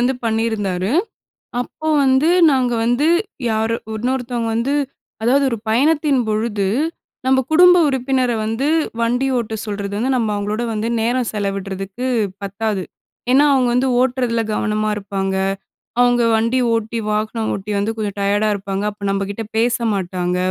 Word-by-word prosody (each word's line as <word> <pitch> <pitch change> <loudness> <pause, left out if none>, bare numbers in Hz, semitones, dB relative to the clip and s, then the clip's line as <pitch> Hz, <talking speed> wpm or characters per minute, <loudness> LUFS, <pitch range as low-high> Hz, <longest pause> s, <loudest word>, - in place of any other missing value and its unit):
வந்து 250 +2 +2
பண்ணியிருந்தாரு. 220 -4 -1 0.7
அப்போ 310 +5 -7 0.2
வந்து 265 +4 +3 0.2
நாங்க 255 -3 +1
வந்து 245 +6 +2 0.4
யாரு 220 +1 0 0.2
உன்னொருத்தவங்க 240 0 -2
வந்து 240 +5 0 0.5
அதாவது 265 +5 +3
ஒரு 235 - -2
பயணத்தின் 285 +3 +3
பொழுது 215 -2 0 0.6
நம்ப 265 0 +4
குடும்ப 360 +2 +7
உறுப்பினர 260 -2 0
வந்து 225 +6 -1 0.3
வண்டி 245 +3 +1
ஓட்ட 225 -2 -3
சொல்றது 200 -1 -4
வந்து, 250 +5 0
நம்ம 225 -3 0
அவுங்களோட 210 +3 -2
வந்து 215 +1 -2
நேரம் 240 +1 0
செலவிட்றதுக்கு 195 +2 -4 0.4
பத்தாது. 200 0 -2 0.5
ஏன்னா 280 +3 +6
அவுங்க 255 -2 +2
வந்து 250 +2 +2
ஓட்டுறதில 250 -2 +1
கவனமா 215 0 0
இருப்பாங்க. 195 -1 -3 0.6
அவுங்க 245 -1 +4
வண்டி 230 +3 +1
ஓட்டி 225 0 -1
வாகனம் 215 +1 -1
ஓட்டி 200 +2 -5
வந்து 210 +3 -1
கொஞ்சம் 205 -2 -3
டயர்டா 205 +2 +1
இருப்பாங்க. 195 0 -4
அப்போ 205 0 -14
நம்ப 195 0 0
கிட்ட 205 +3 -4
பேச 235 +2 +2 0.2
மாட்டாங்க. 180 -2 -2
225 Hz, 140 wpm, -19 LUFS, 205-250 Hz, 0.7 s, குடும்ப